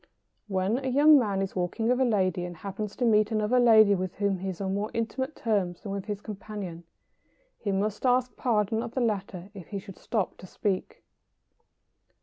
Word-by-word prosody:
When 195 +4 0
a - - -2
young 290 +3 +6
man 200 -5 0
is 195 - -5
walking 185 +5 -1
with 250 +2 +2
a - - +5
lady, 185 -6 +1
and 175 -1 -6
happens 200 +3 -5
to 250 - 0
meet 215 -2 +4
another 220 +3 +2
lady 220 -4 +7
with 185 -2 -2
whom 200 -2 0
he 190 +1 -3
is 180 - -6
on 190 -1 -2
more 205 +2 -1
intimate 260 +5 -2
terms 195 -6 -1
than 200 - -5
with 195 -1 -4
his 205 -2 -4
companion, 200 -5 -7 0.7
he 205 - -2
must 200 +2 -1
ask 255 0 +2
pardon 220 -3 +1
of 230 - -7
the - - +1
latter 200 -4 -2
if 190 -5 -10
he 205 - -5
should 195 -1 -10
stop 215 -5 -2
to 185 - -11
speak. 190 0 -3
205 Hz, 195 wpm, -28 LUFS, 190-230 Hz, 0.7 s, lady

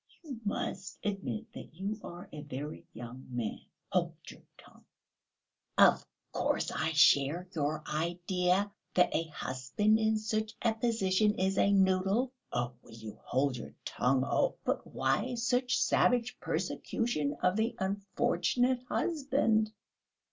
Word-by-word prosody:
"You 270 -8 -7
must 195 -2 -3
admit 195 - -3
that - - -10
you 200 +4 -4
are 175 +1 -8
a 150 - -6
very 145 +1 -6
young 120 +3 -9
man." 120 -4 -3 0.3
"Hold - - +1
your - - -10 0.2
tongue!" - - -18 0.9
"Of - - +6 0.3
course - - 0
I 160 +1 -1
share 150 +3 +4
your 155 -1 -1
idea, 180 +4 0 0.2
that 180 -1 +4
a 165 - +1
husband 155 +9 0
in 220 0 +2
such 215 0 -2
a 230 -1 +3
position 215 -3 +2
is 190 +1 +1
a 200 - +4
noodle." 195 +5 +3 0.2
"Oh, 120 0 -1
will 115 - -16
you 110 -2 -9
hold 130 0 0
your - - -9
tongue? 130 +1 +1
Oh!..." - - +1
"But - - -1
why 255 - 0
such 245 +1 +1
savage 245 -1 +2
persecution 150 - -1
of 180 +1 +3
the 225 +2 0
unfortunate 240 +5 +1
husband?..." 265 -9 +1
190 Hz, 135 wpm, -32 LUFS, 150-220 Hz, 0.9 s, Of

